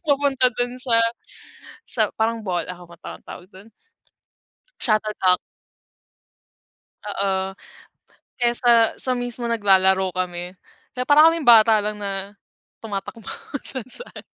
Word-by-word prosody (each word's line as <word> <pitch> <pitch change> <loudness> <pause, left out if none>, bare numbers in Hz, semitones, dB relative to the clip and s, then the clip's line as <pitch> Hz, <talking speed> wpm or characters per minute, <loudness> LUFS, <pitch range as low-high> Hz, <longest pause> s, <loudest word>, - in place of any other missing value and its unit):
papunta 275 -3 +2
dun 245 +1 -3
sa, 245 -3 +1 0.9
sa 220 -3 0
parang 225 +1 0
ball 180 -5 -2
ano 180 -1 -9
bang 170 -1 -17
tawa - - -8
tawag 180 - -11
dun? 195 +4 -15 1.1
Shuttlecock. 215 -5 +1 1.7
Oo 190 -1 -2 0.8
kaya 240 -1 +1
sa 240 0 +3 0.3
sa 255 - 0
mismo 245 -1 -3
naglalaro 190 -4 +3
kami 180 -1 -4 0.4
kaya 250 - -3
parang 305 +2 +7
kaming 330 -3 -4
bata 220 -1 +7
lang 210 +1 -4
na 200 0 -5 0.5
tumatakbo 210 +1 -6
kung 285 +7 -8
saan-saan. 260 - -1
215 Hz, 115 wpm, -22 LUFS, 190-245 Hz, 1.7 s, parang